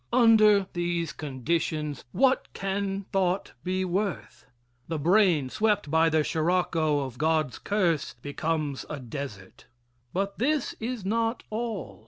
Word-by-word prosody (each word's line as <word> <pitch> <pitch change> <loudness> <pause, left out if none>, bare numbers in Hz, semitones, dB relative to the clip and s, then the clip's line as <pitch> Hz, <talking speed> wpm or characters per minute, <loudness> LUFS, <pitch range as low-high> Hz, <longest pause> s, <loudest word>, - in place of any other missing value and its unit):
Under 215 -4 +6
these 175 -2 -1
conditions 150 +1 -2
what 265 - +2
can 195 0 -2
thought 190 0 0
be 185 +1 -1
worth? 180 - -3 0.4
The 160 - -2
brain, 170 -2 +3
swept 210 -8 +1
by 160 +1 +4
the 155 -1 +2
sirocco 160 -2 +1
of 130 -3 -6
God's 155 -3 +1
curse, 180 -7 0
becomes 145 0 -2
a 150 - -4
desert. 120 -8 -8 0.4
But 195 +2 -2
this 290 +3 +1
is 230 -3 -4
not 230 +3 0
all. 220 -3 -4
175 Hz, 125 wpm, -27 LUFS, 150-205 Hz, 0.4 s, Under